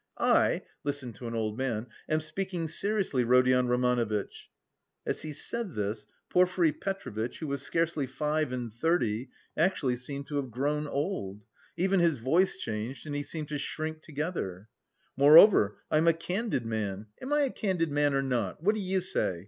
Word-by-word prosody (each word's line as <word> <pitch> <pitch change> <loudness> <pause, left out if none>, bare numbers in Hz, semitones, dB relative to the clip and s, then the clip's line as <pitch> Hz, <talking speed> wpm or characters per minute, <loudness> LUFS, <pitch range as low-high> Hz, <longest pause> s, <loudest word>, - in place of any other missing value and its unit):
I - - +3 0.2
listen 140 -4 -3
to 120 - -8
an 115 - -4
old 110 +1 -2
man 120 -4 -1 0.2
am 155 0 +2
speaking 175 +1 -3
seriously, 195 - 0
Rodion 125 +1 +4
Romanovitch" 120 -4 0 0.6
(as - - -2
he 155 - -5
said 220 +5 -4
this 105 +1 -3 0.2
Porfiry 180 -2 +3
Petrovitch, 125 - -4
who 160 - -5
was 140 -2 -2
scarcely 160 -2 0
five 150 +1 -1
and 120 -3 -4
thirty, 125 -4 0 0.3
actually 155 -7 +1
seemed 140 +3 -6
to 145 - -4
have 135 -2 -2
grown 145 +5 -1
old; 140 - -3 0.3
even 190 +1 +2
his 170 -4 +3
voice 160 +11 +2
changed 115 +5 -5
and 145 -1 -4
he 145 - -1
seemed 150 0 -6
to 150 -1 -3
shrink 155 +2 -4
together) 145 - -4 0.5
"Moreover, 145 - +7
I'm 155 +2 +3
a 165 - +7
candid 180 - -2
man... 105 -2 -3 0.2
am 265 - -5
I 295 0 +3
a 275 -3 +1
candid 180 -6 -1
man 145 -1 +2
or 135 - +2
not? 125 - -2
What 210 +4 +4
do 215 - -3
you 190 0 0
say? 180 - -1
145 Hz, 170 wpm, -29 LUFS, 120-170 Hz, 0.6 s, Moreover